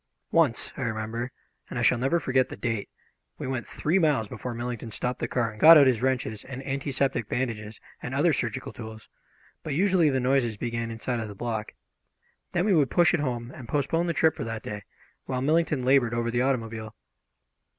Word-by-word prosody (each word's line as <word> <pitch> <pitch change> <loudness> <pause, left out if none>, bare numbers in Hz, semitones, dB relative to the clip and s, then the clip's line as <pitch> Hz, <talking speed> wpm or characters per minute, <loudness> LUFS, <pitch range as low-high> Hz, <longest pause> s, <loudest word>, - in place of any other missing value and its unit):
Once, - - +2
I - - -4
remember, 115 +2 -3 0.4
and - - -5
I - - 0
shall 125 - +4
never 135 +7 +2
forget 130 -3 +1
the - - -6
date, 115 -4 -2 0.5
we - - -5
went 130 -2 -3
three 170 +6 0
miles 145 - +2
before 120 +3 -6
Millington 120 -1 -4
stopped 125 +3 -3
the - - -1
car 115 -3 0
and 105 - -13
got 165 +1 +11
out 145 - +7
his 125 -4 +2
wrenches 125 -5 -1
and 135 0 -8
antiseptic 135 -4 -1
bandages 110 -4 -3 0.2
and - - -4
other - - +3
surgical - - -3
tools; 110 0 -9 0.5
but 150 - -3
usually 180 -2 +4
the 130 -2 +1
noises 125 -4 +1
began 115 0 -3
inside 115 +2 -3
of 110 - -4
the 105 - -9
block. 110 0 -4 0.8
Then 175 +2 +1
we 210 - +3
would 145 -7 +3
push 175 +3 +4
it 175 - +2
home, 120 -4 -3
and 120 -3 -10
postpone 155 +4 0
the 170 - 0
trip 160 +1 +3
for - - -4
that 115 -1 -5
day, 105 -1 -6 0.4
while 130 - -2
Millington 155 -3 +1
laboured 125 -3 +3
over 120 0 -1
the 120 +1 +1
automobile. 115 -4 -2
125 Hz, 200 wpm, -27 LUFS, 115-140 Hz, 0.8 s, got